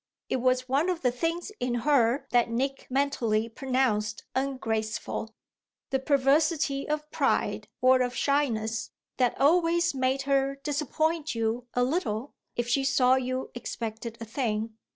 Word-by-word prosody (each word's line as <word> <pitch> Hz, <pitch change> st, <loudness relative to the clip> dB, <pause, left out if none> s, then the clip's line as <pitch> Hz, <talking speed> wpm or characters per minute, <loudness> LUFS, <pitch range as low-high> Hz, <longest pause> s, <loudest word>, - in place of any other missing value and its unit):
It -, -, +1 dB
was 255 Hz, 0 st, +1 dB
one 280 Hz, +7 st, +2 dB
of 350 Hz, -4 st, -2 dB
the 250 Hz, -, +3 dB
things 330 Hz, -, -2 dB
in 245 Hz, -1 st, -1 dB
her 270 Hz, -1 st, +3 dB
that 240 Hz, -1 st, +3 dB
Nick 270 Hz, +4 st, -2 dB
mentally 250 Hz, -5 st, +1 dB
pronounced 230 Hz, -4 st, 0 dB
ungraceful, 225 Hz, -4 st, -2 dB, 0.6 s
the 265 Hz, -, +2 dB
perversity 280 Hz, +1 st, +2 dB
of 300 Hz, 0 st, -2 dB
pride -, -, 0 dB
or 255 Hz, 0 st, +5 dB
of 250 Hz, 0 st, -1 dB
shyness 230 Hz, -6 st, 0 dB, 0.3 s
that 250 Hz, -2 st, +1 dB
always 335 Hz, +3 st, +3 dB
made 265 Hz, 0 st, 0 dB
her 275 Hz, 0 st, +1 dB
disappoint 310 Hz, +1 st, -1 dB
you 230 Hz, +2 st, -1 dB
a 245 Hz, -, +3 dB
little 250 Hz, -, -1 dB, 0.2 s
if 240 Hz, 0 st, -1 dB
she 270 Hz, +3 st, +2 dB
saw 255 Hz, -1 st, +4 dB
you 255 Hz, 0 st, -1 dB
expected 230 Hz, -1 st, -5 dB
a 230 Hz, -, -6 dB
thing. 220 Hz, -2 st, -2 dB
260 Hz, 140 wpm, -28 LUFS, 235-280 Hz, 0.6 s, or